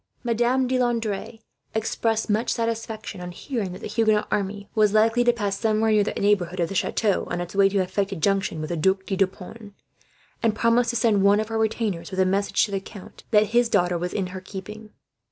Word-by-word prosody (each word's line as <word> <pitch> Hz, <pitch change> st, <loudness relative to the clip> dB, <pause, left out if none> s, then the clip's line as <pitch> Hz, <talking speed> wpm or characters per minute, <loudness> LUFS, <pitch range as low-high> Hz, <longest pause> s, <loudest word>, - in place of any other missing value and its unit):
Madame 240 Hz, +2 st, +1 dB
de 255 Hz, 0 st, 0 dB
Landres 230 Hz, -2 st, -2 dB, 0.3 s
expressed 225 Hz, 0 st, 0 dB
much 220 Hz, +2 st, 0 dB
satisfaction 225 Hz, -4 st, -3 dB
on 180 Hz, 0 st, -6 dB
hearing 205 Hz, 0 st, -4 dB
that 180 Hz, -, -9 dB
the -, -, -5 dB
Huguenot 215 Hz, -1 st, +1 dB
army 200 Hz, 0 st, -2 dB
was 210 Hz, -2 st, +3 dB
likely 225 Hz, +3 st, +4 dB
to 240 Hz, -, +5 dB
pass 205 Hz, -4 st, -3 dB
somewhere 220 Hz, 0 st, +2 dB
near 210 Hz, -1 st, +4 dB
the -, -, -2 dB
neighbourhood 185 Hz, -3 st, +1 dB
of 170 Hz, -1 st, 0 dB
the -, -, -5 dB
chateau, 200 Hz, +1 st, 0 dB
on 175 Hz, -, -2 dB
its 175 Hz, 0 st, -5 dB
way 195 Hz, 0 st, +4 dB
to 200 Hz, -, -1 dB
effect 195 Hz, +1 st, 0 dB
a -, -, -3 dB
junction 195 Hz, -2 st, 0 dB
with 155 Hz, -, -5 dB
the 170 Hz, -, -1 dB
Duc 190 Hz, +4 st, +1 dB
de 195 Hz, -, -2 dB
Deux 195 Hz, 0 st, +3 dB
Ponts; 200 Hz, +3 st, -12 dB, 0.7 s
and 225 Hz, -2 st, +1 dB
promised 230 Hz, +1 st, +2 dB
to 240 Hz, -, -2 dB
send 220 Hz, -4 st, +3 dB
one 200 Hz, +1 st, +5 dB
of 215 Hz, 0 st, -3 dB
her 225 Hz, -, -2 dB
retainers 220 Hz, -5 st, -1 dB
with 190 Hz, -, -5 dB
a 190 Hz, -, +4 dB
message, 195 Hz, +2 st, +1 dB
to 205 Hz, -, -9 dB
the 195 Hz, -, -1 dB
count, 195 Hz, 0 st, -13 dB
that 210 Hz, -1 st, +4 dB
his 240 Hz, 0 st, +3 dB
daughter 180 Hz, -4 st, +2 dB
was 180 Hz, +1 st, -3 dB
in 195 Hz, -, -1 dB
her 185 Hz, -, -6 dB
keeping. 210 Hz, +3 st, -9 dB
210 Hz, 225 wpm, -24 LUFS, 190-225 Hz, 0.7 s, to